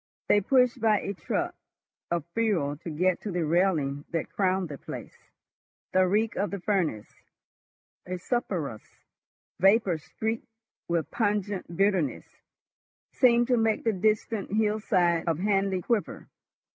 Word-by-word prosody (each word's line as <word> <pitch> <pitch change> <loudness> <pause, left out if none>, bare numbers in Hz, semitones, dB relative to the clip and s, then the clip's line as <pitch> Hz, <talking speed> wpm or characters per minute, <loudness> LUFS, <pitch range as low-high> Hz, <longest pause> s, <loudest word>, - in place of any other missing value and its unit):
They 205 - +4
pushed 250 +2 +3
by 215 -2 +4
a 200 - -3
truck 185 - -2 0.6
of 170 -3 -1
fuel 190 -11 +1
to 170 - -8
get 180 +3 +1
to 215 - -5
the 175 -2 -1
railing 155 -4 +1
that 165 -2 -3
crowned 190 -2 +1
the 140 -3 -7
place. - - -10 0.6
The 185 0 +4
reek 215 +4 +1
of 205 - 0
the 200 - -4
furnace, 175 - 0 1.0
a 185 0 -3
sulphurous 175 - -2 0.8
vapor 195 -3 +4
streaked 220 +8 -4 0.4
with 165 -4 -1
pungent 205 -5 -1
bitterness, 195 -8 +1 0.9
seemed 240 -2 +4
to 250 - +4
make 225 -1 +1
the 225 - +2
distant 215 +1 0
hillside 210 -6 +1
of 165 -3 +1
Hanley 195 -1 +1
quiver. 230 -4 -2
195 Hz, 135 wpm, -27 LUFS, 170-215 Hz, 1.0 s, They